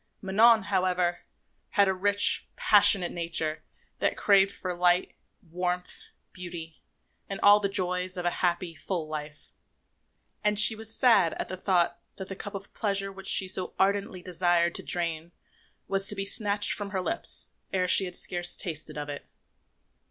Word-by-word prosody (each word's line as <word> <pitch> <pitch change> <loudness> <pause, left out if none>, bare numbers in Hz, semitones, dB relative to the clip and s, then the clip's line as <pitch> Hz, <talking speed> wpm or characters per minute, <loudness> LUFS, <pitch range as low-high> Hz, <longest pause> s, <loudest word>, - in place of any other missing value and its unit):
Manon, 215 +3 +4
however, 185 -3 0 0.5
had 200 -1 +3
a 190 - +1
rich, 200 +2 +1
passionate 200 -3 +5
nature 165 -2 -3 0.4
that - - 0
craved 200 -1 +4
for 185 -2 -5
light, 175 +1 +1 0.4
warmth, 180 +1 -3 0.3
beauty 170 -3 -8 0.5
and 195 - -5
all 205 +1 +7
the 200 -1 -1
joys 180 -1 -1
of 175 - -4
a 175 - +1
happy, 175 -1 -1
full 165 +1 -5
life; 150 0 -8 0.9
and 210 0 +1
she 215 +2 +6
was 220 +1 -8
sad 205 -10 +3
at - - -5
the 185 - -4
thought 180 -2 0 0.2
that 190 - -8
the 195 - -6
cup 205 +1 -7
of 195 0 -9
pleasure 195 -2 -1
which 195 0 -8
she 190 - +3
so 185 0 -2
ardently 195 -2 -1
desired 175 -1 +1
to - - -4
drain 170 -1 -3 0.5
was 195 0 +1
to 210 - +2
be 195 0 -3
snatched 205 0 -1
from 205 -1 -1
her 190 -2 -3
lips 335 - -1 0.2
ere 185 -1 0
she 190 - +5
had 180 -1 -8
scarce 175 -1 0
tasted 155 -3 -5
of 145 0 -5
it. 145 -1 -8
185 Hz, 165 wpm, -27 LUFS, 175-200 Hz, 0.9 s, all